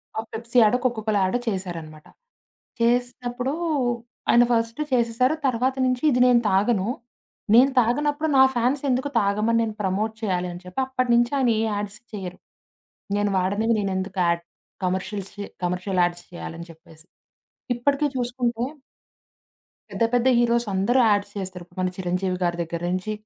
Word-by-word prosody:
ఆ! - - -1
పెప్సి 235 +2 -3
యాడో, 220 +3 +5
కోకొకోల 220 -3 0
యాడో 190 +6 +1
చేసారనమాట. 170 -6 -5 0.7
చేసినప్పుడు 245 +2 0 0.8
ఆయన 240 - +6
ఫస్ట్ 230 +2 0
చేసేసారు. 250 +3 +2
తర్వాత 255 +2 0
నుంచి 255 +1 0
"ఇది 250 - +1
నేను 245 -1 +5
తాగను, 195 +1 +2 0.7
నేను 255 +4 +7
తాగనప్పుడు 290 +6 +1
నా 265 - +8
ఫ్యాన్స్ 250 +4 +1
ఎందుకు 260 +3 0
తాగమని, 215 +3 +1
నేను 220 -1 -4
ప్రమోట్ 205 +3 -1
చేయాలి" 180 -4 -1
అని 175 - -9
చెప్పి, 180 +7 -5
అప్పటి 255 -2 -1
నుంచి 240 0 +3
ఆయన 255 -3 +2
ఏ - - +1
యాడ్స్ 205 +1 -4
చేయరు. 185 -3 -6 0.8
నేను 205 0 +1
వాడనేవి 205 +5 +1
నేను 195 -2 -1
ఎందుకు 190 0 -4
ఆడ్ 170 0 0 0.4
కమర్షియల్ 190 +2 -2
చే 205 - -6 0.2
కమర్షియల్ 180 +1 0
యాడ్స్ 175 0 -1
చేయాలని 170 -1 -8
చెప్పేసి. 160 0 -17 0.7
ఇప్పటికే 280 +4 +1
చూసుకుంటే... 245 -1 -1 1.3
పెద్ద, - - -1
పెద్ద 245 +1 +3
హీరోసందరూ 235 -1 +2
యాడ్స్ 205 0 +1
చేస్తారు. 185 -2 -6
ఇపుడు 175 +1 -27
మన 185 - +1
చిరంజీవి 180 0 -1
గారి 175 -1 0
దగ్గర 170 0 -4
నుంచి, 185 +4 -2
215 Hz, 145 wpm, -24 LUFS, 185-245 Hz, 1.3 s, నా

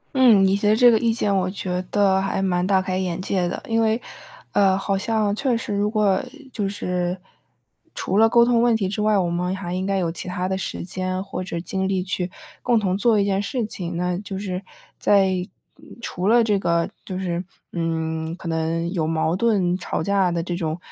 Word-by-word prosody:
嗯， 235 -7 +6
你 190 +1 +3
提 205 +1 0
的 215 - +5
这 240 +1 +7
个 220 - +3
意 230 -1 +2
见 210 -3 0
我 185 0 0
觉 185 -2 -3
得 195 -2 +3
还 195 0 -1
蛮 180 -1 +1
大 190 -2 +3
开 185 0 -2
眼 185 -1 -2
界 185 -1 0
的。 175 - -4
因 225 0 0
为 225 +2 +1 0.5
呃， 195 -2 +3
好 195 0 -1
像 215 0 0
确 250 +2 0
实 230 -2 -3
如 205 +1 +1
果 210 -3 +2 0.3
就 205 -4 -2
是 180 -2 -2 0.8
除 195 - -1
了 225 - +7
沟 235 +1 +5
通 235 -1 +3
问 240 -1 +4
题 200 -4 -1
之 205 +2 -3
外， 215 -1 +3
我 175 -2 +1
们 180 +2 -1
还 180 -2 -5
应 185 +1 -2
该 195 0 0
有 170 -3 0
其 170 - -5
他 180 0 -2
的 190 - -1
时 190 - -4
间 185 +1 -3
或 195 -1 -5
者 170 -2 -4
精 190 +1 -2
力 190 -2 0
去 180 -1 -2 0.3
共 240 -1 +2
同 195 -3 0
做 220 +1 +3
一 - - +2
件 200 0 +1
事 230 +3 -2
情， 175 -4 -4
那 180 +1 -1
就 195 -1 -6
是 190 -2 -4 0.4
在 195 -2 +4 0.7
除 185 -4 -3
了 235 +2 +5
这 210 -3 +1
个 170 -2 +1 0.2
就 185 - -5
是， 175 -2 -2 0.3
嗯， 160 -1 -2
可 175 -2 -7
能 165 +1 -1
有 160 -4 -1
矛 160 0 0
盾 195 -6 +2
吵 - - -3
架 200 -2 +2
的 170 -1 -1
这 175 -1 -3
种， 160 -2 -2
190 Hz, 230 characters per minute, -23 LUFS, 180-205 Hz, 0.8 s, 这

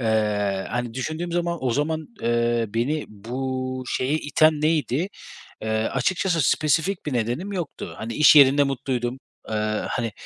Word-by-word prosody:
Eee, 105 -4 0
hani, 120 -1 -3
düşündüğüm 160 +6 -3
zaman 170 0 -1
o 125 - +2
zaman, 155 +5 -1 0.2
eee, 120 0 +1
beni 125 +8 -1
bu 130 +4 -4
şeye 135 +4 0
iten 155 0 +3
neydi? 155 +1 +1 0.5
Eee, 110 - -3 0.2
açıkçası 170 - 0
spesifik 160 +4 +1
bir 150 - -2
nedenim 125 - -2
yoktu. 175 -6 -5
Hani, 115 +1 -5
iş 150 0 +7
yerinde 140 0 +7
mutluydum. 130 -2 -2 0.3
Eee, 110 - -3 0.4
hani, 115 -3 -2
130 Hz, 140 wpm, -24 LUFS, 120-155 Hz, 0.5 s, iş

